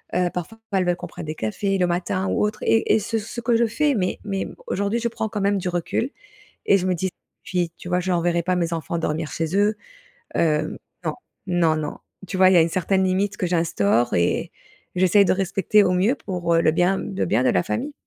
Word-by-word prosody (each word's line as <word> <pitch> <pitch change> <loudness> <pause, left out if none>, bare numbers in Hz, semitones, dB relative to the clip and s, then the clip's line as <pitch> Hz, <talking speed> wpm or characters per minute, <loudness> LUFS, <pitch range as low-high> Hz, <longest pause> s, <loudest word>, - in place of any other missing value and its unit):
heu, 180 0 +2
parfois 180 +6 -6
elles 190 -1 +3
veulent 175 0 +2
qu'on 175 - -7
prenne 165 - -8
des 155 +1 -4
cafés 195 - -1
le 180 - +3
matin 185 +2 -1
ou - - +1
autre, 210 - -3
et 225 - +3
et - - +3
ce 225 +2 -2
ce 225 +3 -7
que 235 0 +2
je 235 0 +3
fais, 290 +4 +1
mais 185 -3 -1
mais 195 -2 -2 0.2
aujourd'hui 200 +4 0
je 235 - 0
prends 220 -1 -3
quand 205 -2 -3
même 200 0 +2
du 180 - -2
recul, 175 - -1 0.6
et 200 - +5
je 185 - -2
me 185 - +2
dis 185 +3 -1 0.4
puis, 175 -3 -1
tu - - -9
vois? 180 0 +1
Je 185 0 -1
renverrais 170 0 +1
pas 180 0 +1
mes 170 -1 -1
enfants 165 +1 -3
dormir 160 -1 -2
chez 165 +3 -2
eux, 205 +1 +3 0.6
hem, 155 -1 +1 0.3
non, - - 0 0.3
non, 170 -3 +2
non. 150 -1 -4 0.3
Tu 190 - -4
vois, 185 0 +7
il - - +4
y 180 - +6
a - - +7
une 165 - +2
certaine 190 +2 +1
limite 195 +3 0
que 180 - -1
j'instaure 120 - +1
et 85 0 +1 0.4
j'essaie 185 +2 +5
de - - +2
respecter 195 +2 +2
au 185 - +2
mieux 200 +9 +2
pour, 180 -8 -2
heu, 165 - +4
le 155 - +4
bien 180 +4 +2
le 95 0 -2
bien 110 +8 +2
de - - +3
la - - +2
famille. 275 +11 -3
180 Hz, 240 wpm, -23 LUFS, 170-200 Hz, 0.6 s, vois